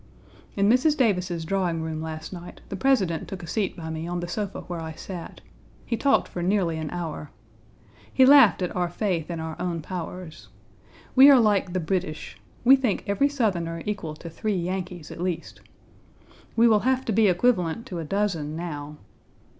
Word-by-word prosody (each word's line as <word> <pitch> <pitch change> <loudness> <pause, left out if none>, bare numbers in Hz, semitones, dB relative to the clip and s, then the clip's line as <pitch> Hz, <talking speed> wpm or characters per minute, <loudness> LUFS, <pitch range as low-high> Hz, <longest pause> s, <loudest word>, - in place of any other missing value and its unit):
In 200 0 +2
Mrs. 255 +7 +4
Davis's 180 -8 0
drawing 175 -3 -1
room 160 -1 -4
last 160 +2 -6
night, 175 -1 -10
the - - -4
President 195 -8 +1
took 190 -2 -7
a - - -8
seat 200 +1 -2
by 160 -1 -6
me 160 +1 -4
on 175 0 -2
the 175 - -4
sofa 200 +3 -4
where 175 -2 -6
I 160 0 -6
sat. 175 +1 -8 0.4
He 230 - -1
talked 275 +5 +2
for 175 - -6
nearly 175 -3 +1
an 155 -1 -4
hour. 165 -4 -5 0.8
He 260 - +5
laughed 260 - +7
at 180 - -3
our 180 -1 0
faith 175 -3 -2
in 170 -1 -4
our 160 0 -5
own 170 -3 -2
powers. 180 -2 -7 0.7
We 270 +2 +9
are 275 -3 +8
like 205 -5 +2
the 185 - 0
British. 170 -2 -3 0.3
We 260 +3 +8
think 250 -7 -1
every 200 +8 +2
Southerner 175 - -1
equal 195 -7 -4
to 165 +2 -9
three 210 +5 -2
Yankees 180 -2 -4
at - - -8
least. 180 -2 -4 0.9
We 235 +1 +5
will 215 -2 +5
have 260 +3 0
to - - -1
be 215 0 +4
equivalent 185 +1 +1
to 180 -9 -6
a - - -3
dozen 165 -4 -1
now. 150 -3 -6
180 Hz, 185 wpm, -25 LUFS, 165-210 Hz, 0.9 s, We